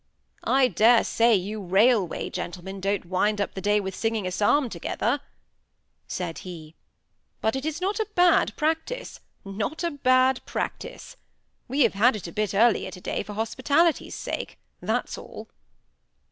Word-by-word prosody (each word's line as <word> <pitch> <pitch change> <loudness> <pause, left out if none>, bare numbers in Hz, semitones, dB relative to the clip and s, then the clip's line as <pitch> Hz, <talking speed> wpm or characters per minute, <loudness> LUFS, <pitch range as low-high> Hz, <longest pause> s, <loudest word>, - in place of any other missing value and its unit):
"I 265 -1 +5
dare 230 0 +5
say 230 0 +3
you 205 +3 -3
railway 195 +1 +2
gentlemen 180 +2 -6
don't 200 0 -1
wind 205 +4 0
up 200 - -1
the 190 - -6
day 210 +1 +2
with 190 -1 -4
singing 225 0 -1
a 185 - -2
psalm 245 +9 +2
together," 230 - -2 0.9
said 175 -3 -4
he; 165 -4 -9 0.7
"but 220 +3 0
it 265 +3 -3
is 315 +1 -3
not 395 +4 -1
a 440 - 0
bad 355 -1 +4
practice—not 315 - -3
a 340 - 0
bad 255 -2 +3
practice. - - -5 0.5
We 275 +4 0
have 235 - +4
had 225 +5 +4
it 210 - -7
a 170 - -6
bit 210 +1 -2
earlier 230 +2 +3
to 180 - -10
day - - -2
for 210 - -8
hospitality's 280 +9 +1
sake—that's - - -4
all." - - -10
220 Hz, 150 wpm, -25 LUFS, 195-265 Hz, 0.9 s, I